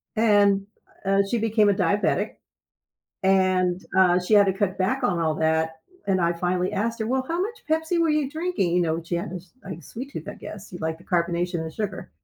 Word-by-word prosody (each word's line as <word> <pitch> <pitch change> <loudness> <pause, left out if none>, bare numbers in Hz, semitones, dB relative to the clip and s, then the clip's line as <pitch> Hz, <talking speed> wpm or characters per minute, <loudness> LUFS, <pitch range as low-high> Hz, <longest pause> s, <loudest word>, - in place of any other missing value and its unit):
and, 205 -3 +4 0.4
uh, 195 0 +3
she 240 - +1
became 220 -2 +3
a - - +4
diabetic. 195 +2 +1 0.9
And, 185 -1 +3 0.2
uh, 180 -1 +5
she 180 +4 +1
had 205 -1 +7
to 190 - +2
cut 195 -1 -1
back 235 +9 0
on 200 -8 +1
all 160 -2 +1
that, 160 0 +1 0.3
and 190 -2 +2
I 170 0 +2
finally 180 +2 -1
asked 225 +3 -1
her, 220 - -1
"Well, 260 +1 0
how 335 +2 -1
much 440 +5 -4
Pepsi 320 +2 +1
were 335 - +3
you 300 -3 +1
drinking?" 315 - -1
You 180 - +3
know, 165 0 -1
she 170 +1 -3
had 170 - -4
this, 180 -1 -8
like, 180 -3 -7
sweet 260 - -8
tooth, 160 - -7
I - - -5
guess, 210 -1 -10
you 175 - -6
like 160 0 -2
the 175 - -18
carbonation 175 0 0
and 160 0 -5
sugar. 200 -1 -5
190 Hz, 215 wpm, -25 LUFS, 175-220 Hz, 0.9 s, had